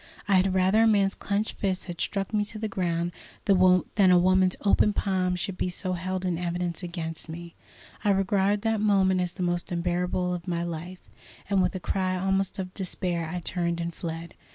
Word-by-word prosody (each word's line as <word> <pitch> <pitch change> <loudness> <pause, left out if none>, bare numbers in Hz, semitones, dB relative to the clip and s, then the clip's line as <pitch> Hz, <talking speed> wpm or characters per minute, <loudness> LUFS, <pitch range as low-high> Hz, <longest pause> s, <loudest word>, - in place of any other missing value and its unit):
I 200 - +2
had 190 0 +3
rather 190 +4 +4
a 225 - +5
man's 200 -3 +3
clenched 205 +2 -2
fist 190 -2 -1
had 175 -3 -6
struck 195 0 -1
me 210 -1 +2
to 215 +1 -7
the 220 +1 -2
ground 175 -3 -1 0.3
than 185 -2 +5
that 195 -3 +5
a 180 - +7
woman's 185 +1 +3
open 205 +1 +4
palm 185 -3 0
should 185 +1 -4
be - - 0
so 185 +1 -2
held 185 +1 -3
in 175 -2 -1
evidence 175 -1 -2
against 170 -2 -5
me. 170 +1 -8 0.5
I 210 - +2
regard 195 +1 +2
that 225 -2 +1
moment 190 -3 +3
as 180 -1 -2
the 185 - -3
most 175 0 -1
unbearable 180 +1 0
of 175 0 -6
my 170 -1 -1
life, 175 +2 -6 0.4
and 195 -1 +4
with 185 +1 0
a - - -2
cry 185 0 -1
almost 195 +1 0
of 185 -1 -5
despair 175 -3 -2
I 180 +1 -4
turned 170 -1 -1
and 170 0 -3
fled. 165 0 -6
185 Hz, 200 wpm, -27 LUFS, 175-195 Hz, 0.5 s, a